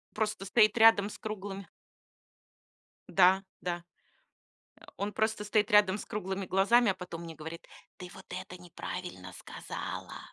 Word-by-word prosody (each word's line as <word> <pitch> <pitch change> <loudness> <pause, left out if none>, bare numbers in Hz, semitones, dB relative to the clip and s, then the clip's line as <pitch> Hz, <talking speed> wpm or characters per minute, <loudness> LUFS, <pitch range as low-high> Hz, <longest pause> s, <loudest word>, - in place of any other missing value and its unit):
Просто 210 -2 -1
стоит 215 +3 +4
рядом 220 -3 +6
с - - -9
круглыми 200 -2 -6 1.5
Да 190 +1 +6 0.2
да, 175 -1 -3 1.1
он 205 +1 -3
просто 220 -1 0
стоит 210 0 +1
рядом 205 -2 +5
с - - -7
круглыми 195 -1 -4
глазами, 205 +6 +4
а - - -5
потом 175 -2 -7
мне 165 -1 -8
говорит: 160 +2 -9 0.3
"Ты 180 -1 -9
вот 190 - -13
это 185 0 -6
неправильно 175 - -7
сказала!" - - -7
195 Hz, 135 wpm, -30 LUFS, 180-210 Hz, 1.5 s, рядом